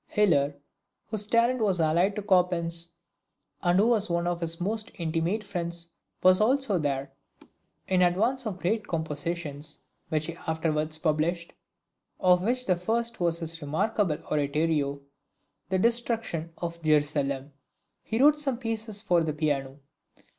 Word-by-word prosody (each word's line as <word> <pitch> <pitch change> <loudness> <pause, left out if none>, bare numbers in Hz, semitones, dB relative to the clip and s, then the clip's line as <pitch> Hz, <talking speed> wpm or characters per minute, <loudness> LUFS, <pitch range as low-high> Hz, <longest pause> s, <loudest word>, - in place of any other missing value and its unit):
Hiller, 145 -9 +2 0.6
whose 210 -2 -1
talent 235 +3 +3
was 195 -5 +2
allied 170 +5 +2
to 210 - -4
Chopin's, 170 -3 +2 0.7
and 175 0 +3
who 210 - +5
was 220 -4 +2
one 170 0 0
of 175 0 -1
his 165 0 -1
most 215 +4 -2
intimate 170 +4 -1
friends, 170 -3 -4 0.3
was 185 0 +7
there 215 - +4
also. 175 - 0 0.8
In 185 -1 +2
advance 225 +9 +2
of 205 - -3
the - - -20
great 210 +4 0
compositions 155 -1 -4 0.3
which 155 -1 0
he 170 - -4
afterwards 155 -1 -1
published, 165 +2 -1 0.7
of 180 -1 +4
which 250 +5 0
the 185 -2 +2
first 230 +5 -1
was 170 -2 +1
his 165 0 -4
remarkable 160 +3 0
Oratorio, 145 -1 0 0.7
"The 190 - +2
Destruction 230 -6 0
of 170 -1 -5
Jerusalem," 145 -2 +1 0.5
he 225 - -3
wrote 295 +2 +6
some 270 -5 -1
pieces 225 -3 -4
for 175 -4 +3
the 155 -1 -1
Piano. 145 -3 -1
175 Hz, 140 wpm, -27 LUFS, 155-210 Hz, 0.8 s, was